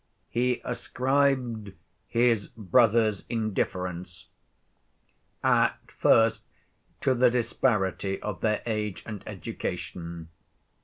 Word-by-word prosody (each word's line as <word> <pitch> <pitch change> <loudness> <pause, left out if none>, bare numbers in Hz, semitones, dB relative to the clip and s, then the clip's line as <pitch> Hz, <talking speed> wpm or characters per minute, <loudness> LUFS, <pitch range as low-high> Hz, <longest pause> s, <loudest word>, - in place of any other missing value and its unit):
He 125 +1 +1
ascribed 125 -4 0 0.3
his 115 -3 +2
brother's 110 -1 +2
indifference 90 -5 -3 1.1
at - - +3
first 115 -1 +4 0.6
to 130 - +3
the 125 0 +5
disparity 105 -5 0
of 105 -6 -5
their 105 -1 +1
age 105 -4 -2
and 105 -3 -6
education. 85 -2 -5
110 Hz, 85 wpm, -27 LUFS, 95-120 Hz, 1.1 s, the